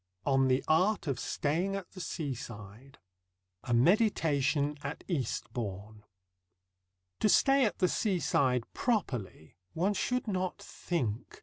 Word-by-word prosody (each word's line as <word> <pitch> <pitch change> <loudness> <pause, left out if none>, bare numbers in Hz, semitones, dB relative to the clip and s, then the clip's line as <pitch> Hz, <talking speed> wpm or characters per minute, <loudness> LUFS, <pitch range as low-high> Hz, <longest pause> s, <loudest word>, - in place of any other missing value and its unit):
ON 135 -1 +3
THE 130 +1 +2
ART 185 +7 +3
OF 135 -5 -2
STAYING 175 +7 -1
AT 195 -3 -6
THE 185 - -8
SEASIDE 125 - -6 0.7
A 125 - -4
MEDITATION 150 - +2
AT - - -6
EASTBOURNE 110 - -4 1.2
To 215 - +3
stay 270 +4 +5
at 210 - -1
the 185 - +3
seaside 140 - +1
properly, 125 - -2 0.2
one 190 +5 +1
should 250 +5 -1
not 185 -3 -1
think. 120 - -4
145 Hz, 115 wpm, -31 LUFS, 125-190 Hz, 1.2 s, stay